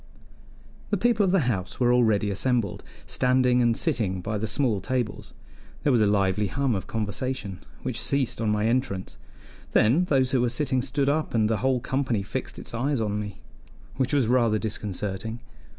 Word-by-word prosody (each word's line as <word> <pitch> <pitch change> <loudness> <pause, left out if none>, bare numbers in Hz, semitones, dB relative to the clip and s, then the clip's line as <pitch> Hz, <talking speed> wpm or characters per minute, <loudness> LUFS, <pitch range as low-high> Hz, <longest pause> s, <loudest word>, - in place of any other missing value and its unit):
The 205 - +1
people 230 +1 +2
of 190 - +2
the 195 -2 +3
house 105 -8 -2
were 120 -1 +4
already 110 -4 +3
assembled, 120 +1 0 0.2
standing 125 -1 +2
and 120 -1 +2
sitting 110 - 0
by 105 +3 -3
the 110 - -2
small 110 -2 +1
tables. 125 -4 -3 0.5
There 145 - +3
was 120 -3 +4
a 105 - +4
lively 100 0 +2
hum 135 +6 0
of 95 - -3
conversation, 105 -2 -3 0.2
which 125 -3 -2
ceased 135 -5 0
on 110 - +1
my 105 0 +1
entrance; 115 -5 -1 0.5
then 140 +12 +4
those 135 -6 +2
who 130 - +2
were 120 - +2
sitting 130 +1 0
stood 140 +2 -1
up 150 -2 0
and 110 -2 +3
the 110 0 +1
whole 130 +1 +1
company 125 -4 -1
fixed 100 - -5
its - - -7
eyes 135 +3 0
on 105 -2 -1
me, 105 -2 -7 0.6
which 130 -1 0
was 140 -4 +3
rather 115 -2 +3
disconcerting. 105 +1 -4
120 Hz, 180 wpm, -26 LUFS, 105-130 Hz, 0.6 s, were